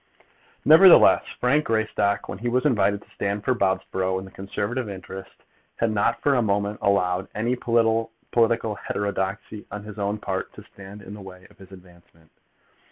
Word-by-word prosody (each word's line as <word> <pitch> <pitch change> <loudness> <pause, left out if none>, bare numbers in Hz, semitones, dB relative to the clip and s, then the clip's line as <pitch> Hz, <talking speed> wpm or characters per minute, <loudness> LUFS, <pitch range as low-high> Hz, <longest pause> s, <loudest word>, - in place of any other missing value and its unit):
Nevertheless 170 +4 +7
Frank 140 +5 +2
Greystock, 110 -2 0
when 95 - -7
he 120 +2 -2
was 125 +4 0
invited 105 -6 +1
to - - -27
stand 100 +1 -3
for 130 - +2
Bobsborough 95 -3 -1
in 95 - -6
the 95 - -13
Conservative 105 +5 -4
interest, 95 0 -10 0.3
had 115 -1 0
not 105 -1 +1
for 145 - +3
a 125 - +2
moment 100 -1 -1
allowed 90 -3 +1
any 115 +4 0
political 115 -1 0
heterodoxy 100 +1 -4
on 105 +1 -7
his 105 0 -10
own 100 +1 -1
part 95 -2 -4
to - - -12
stand 100 +1 -12
in 105 - -10
the 105 - -10
way 95 -1 -12
of - - -24
his 95 0 -15
advancement. 85 -3 -18
105 Hz, 165 wpm, -24 LUFS, 95-115 Hz, 0.3 s, Nevertheless